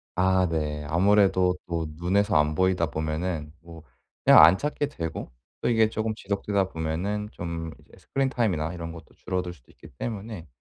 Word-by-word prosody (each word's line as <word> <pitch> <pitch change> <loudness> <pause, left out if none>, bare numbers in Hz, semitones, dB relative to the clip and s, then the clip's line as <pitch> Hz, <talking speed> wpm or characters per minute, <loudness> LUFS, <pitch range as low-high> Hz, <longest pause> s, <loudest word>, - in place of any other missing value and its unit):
아 95 0 +3
네. 75 -2 -2
아무래도 95 +2 +3
또 85 -1 -2
눈에서 100 +3 +1
안 75 +1 +2
보이다 95 -2 +2
보면은 80 0 -3
뭐 80 -2 -12 0.4
그냥 - - +9
안 85 +4 +7
찾게 145 +2 -2
되고 80 - -6 0.3
또 - - +1
이게 110 -2 +4
쪼끔 110 0 -2
지속되다 100 -1 -1
보면은 90 +7 -3
좀 85 -1 -5
이제 - - -23
스크린 135 -1 -1
타임이나 90 - -1
이런 85 -1 -6
것도 80 -1 -12
줄어들 90 -1 -3
수도 65 -8 -22
있기 - - -15
때문에 105 -6 -5
90 Hz, 345 characters per minute, -26 LUFS, 80-100 Hz, 0.4 s, 그냥